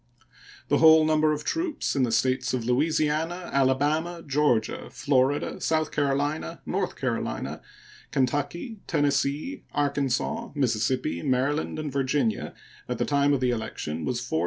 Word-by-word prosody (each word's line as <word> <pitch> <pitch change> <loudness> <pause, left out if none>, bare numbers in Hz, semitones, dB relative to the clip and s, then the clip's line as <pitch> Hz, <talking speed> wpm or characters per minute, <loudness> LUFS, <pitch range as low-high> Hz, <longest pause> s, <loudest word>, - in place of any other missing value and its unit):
The - - +3
whole 160 0 +7
number 155 0 +3
of 150 0 -2
troops 325 - -1
in 135 - +2
the 125 -3 +1
States 130 +3 +1
of 120 -3 -3
Louisiana, 155 +6 0
Alabama, 150 +6 +1
Georgia, 140 -6 +1
Florida, 135 +2 0
South 155 -1 0
Carolina, 145 - -1
North - - -2
Carolina, - - -3 0.5
Kentucky, 145 - -1
Tennessee, 145 - 0
Arkansas, 145 - 0
Mississippi, 120 - 0
Maryland, 140 +5 0
and 155 -2 -4
Virginia 135 -4 0 0.3
at - - -2
the - - 0
time 145 0 +2
of 140 -2 +1
the 125 -1 +2
election 85 -9 -4
was 125 -2 -1
4,082. 120 -9 -1
145 Hz, 135 wpm, -26 LUFS, 130-155 Hz, 0.5 s, whole